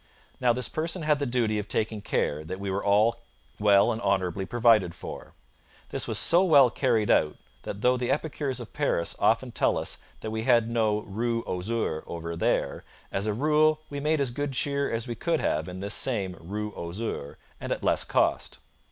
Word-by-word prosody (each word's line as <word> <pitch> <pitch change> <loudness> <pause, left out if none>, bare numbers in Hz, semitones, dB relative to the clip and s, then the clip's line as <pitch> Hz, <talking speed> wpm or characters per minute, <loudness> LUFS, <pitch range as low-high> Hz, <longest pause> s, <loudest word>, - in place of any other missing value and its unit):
Now, 125 -2 +3
this 125 +1 0
person 165 +2 -3
had 150 -1 +2
the 140 - -1
duty 115 -3 0
of 105 - -5
taking 110 0 -1
care 75 -6 -1
that 95 +4 -6
we 100 -1 -3
were 100 +1 -2
all 110 +3 +3 0.4
well 100 +2 +5
and 115 0 -4
honourably 95 -2 0
provided 110 -7 +3
for. - - -9 0.5
This - - -1
was - - +1
so 175 +3 +6
well 140 -9 +6
carried 115 -6 +1
out 75 - +2 0.3
that 100 - -7
though 125 +2 +3
the 125 -1 -2
epicures 145 -3 -2
of - - -9
Paris 85 - 0
often - - +2
tell - - +1
us - - -2 0.2
that 110 - -5
we 110 0 -2
had 115 -2 +3
no 110 -2 +1
Rue 115 +3 -2
aux - - -3
Ours 110 -9 -1
over 85 0 -5
there, 85 - -1 0.3
as 100 +2 -2
a 105 - 0
rule 155 +3 +3
we 145 - -4
made 155 +2 +1
as 135 -3 0
good 145 +2 -3
cheer 140 +2 0
as 115 0 -2
we 120 - -3
could 160 +8 -1
have 80 +3 -1
in 90 +1 -7
this 100 +1 -1
same 100 -8 +1
Rue 105 +5 -5
aux 85 +1 -6
Ours, 90 -11 -5 0.2
and - - -6
at - - -2
less - - +2
cost. - - 0
115 Hz, 205 wpm, -27 LUFS, 100-130 Hz, 0.5 s, so